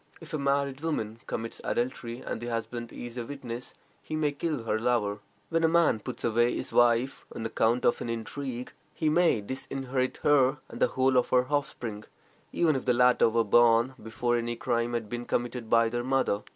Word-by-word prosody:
If 165 +1 -12
a 155 - -1
married 140 0 0
woman 115 -9 -2
commits 115 +1 -4
adultery, 120 -1 -2
and - - -5
the 120 - -5
husband 115 0 -4
is 120 0 -7
a - - -2
witness, 125 -4 -7 0.3
he 155 - -5
may 150 -2 +1
kill 145 -3 -3
her 110 -1 0
lover. 110 -4 0 0.3
When 165 0 +1
a - - +6
man 165 -8 +3
puts 125 +3 -7
away 120 +1 +2
his - - -5
wife 120 +2 +3
on 115 - -4
account 115 +2 +1
of - - +2
an - - -3
intrigue, 125 +2 -5 0.2
he 155 - +1
may 165 -8 +3
disinherit 130 +2 -3
her 140 -1 +4
and - - -9
the - - +6
whole 130 0 +2
of 125 - +2
her 125 0 +3
offspring, 120 -7 -2 0.5
even 160 -4 +2
if 130 - -3
the 125 -1 +3
latter 125 -1 +5
were 115 +1 +2
born 120 +3 +4
before 120 +2 -1
any 120 0 -2
crime 115 +1 -1
had 115 -2 -2
been 120 +2 -5
committed 120 -1 -2
by 115 0 +5
their 120 +1 -2
mother. 130 -5 +1
120 Hz, 195 wpm, -28 LUFS, 115-135 Hz, 0.5 s, a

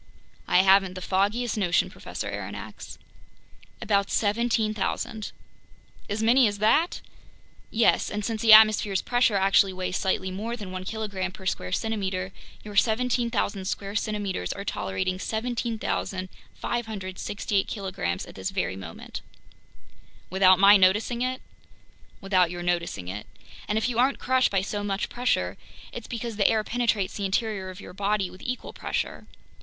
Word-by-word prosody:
"I 185 - +5
haven't 190 -1 +4
the - - -5
foggiest 205 +6 0
notion, 175 -4 +2
Professor - - -6
Aronnax." - - -7 0.9
"About 200 -3 +1
17,000." 220 0 0 0.8
"As 210 +2 -1
many 240 +2 +5
as 205 -1 -2
that?" 295 - +2 0.7
"Yes, 225 +1 +3
and 210 -1 -3
since 225 -2 -2
the 225 - +5
atmosphere's 215 -3 +7
pressure 245 -3 +2
actually 195 0 +4
weighs 185 0 -2
slightly 190 -1 -1
more 225 +5 -4
than 200 -5 -7
one 185 0 -5
kilogram 200 -3 -3
per 190 - -12
square 90 - -2
centimeter, 190 - -2 0.3
your 210 -1 -9
17,000 235 -3 +1
square 200 +1 -3
centimeters 205 - -2
are - - -7
tolerating 95 - -2
17,568 215 -3 -3
kilograms 185 - -3
at - - -12
this 95 -1 -4
very 95 - -2
moment." 90 -4 -8 1.1
"Without 185 0 +6
my 200 +2 +8
noticing 210 +6 +3
it?" 255 +1 -2 0.8
"Without 185 -3 +2
your 175 0 -5
noticing 170 - -1
it. 100 +3 -6 0.4
And 210 - 0
if 220 - +1
you 240 -2 -1
aren't 265 +3 +3
crushed 260 0 +2
by 195 -2 +1
so 205 +1 -3
much 200 0 -2
pressure, 250 +1 0 0.4
it's - - -7
because 230 -2 -5
the 200 - +4
air 220 -1 +2
penetrates 220 -5 0
the 200 - -2
interior 195 -1 -1
of 185 0 -9
your - - -10
body 200 -1 0
with 185 - -13
equal 250 0 -5
pressure. - - -4
205 Hz, 145 wpm, -26 LUFS, 185-225 Hz, 1.1 s, my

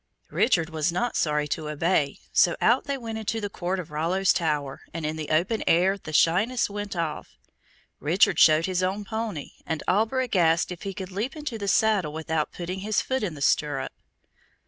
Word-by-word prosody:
Richard 165 -8 +2
was 160 +1 0
not 240 +8 -1
sorry 150 -1 +1
to 155 +1 -3
obey, 150 -2 0 0.2
so 175 - +4
out 240 +3 +3
they 280 -1 -2
went 225 -3 -5
into 220 +1 -2
the 205 -2 -4
court 185 +1 -2
of 165 -4 -7
Rollo's 175 +5 +2
tower, 150 -5 -1
and 165 -2 -3
in 155 +1 -2
the 155 -1 -5
open 180 +8 +1
air 185 +4 +4
the 180 -5 -9
shyness 200 +10 +2
went 205 -1 -5
off. 165 -3 -4 0.6
Richard 165 +6 +3
showed 155 +1 +6
his 185 -1 -1
own 195 +3 -1
pony, 220 -8 -4
and 160 -2 -3
Alberic 225 +4 +1
asked 165 0 +3
if 175 - -7
he 195 -1 -5
could 190 0 -6
leap 215 +10 -3
into 295 -7 -5
the 200 - -4
saddle 195 -6 +2
without 160 -1 -2
putting 180 +2 -5
his 210 +2 0
foot 260 0 -1
in 185 -7 -3
the 140 - -4
stirrup. 140 0 +1
180 Hz, 190 wpm, -26 LUFS, 155-210 Hz, 0.6 s, showed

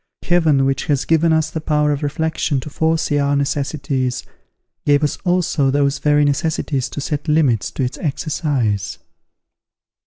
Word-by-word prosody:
Heaven, 160 -6 +3
which 135 0 0
has 145 -2 0
given 165 0 +3
us 160 0 +1
the 160 - -4
power 150 -1 +1
of 145 0 -2
reflection 150 -1 -1
to 150 - -9
foresee 160 -1 0
our 140 0 +1
necessities, 140 -2 -1 0.6
gave 145 +1 +3
us 150 - 0
also 175 -6 +1
those 140 0 +1
very 150 0 +3
necessities 145 -2 -1
to - - -6
set 145 +2 -3
limits 150 -8 +2
to 135 - -3
its 125 - -3
exercise. 135 - -1
145 Hz, 150 wpm, -19 LUFS, 140-155 Hz, 0.6 s, Heaven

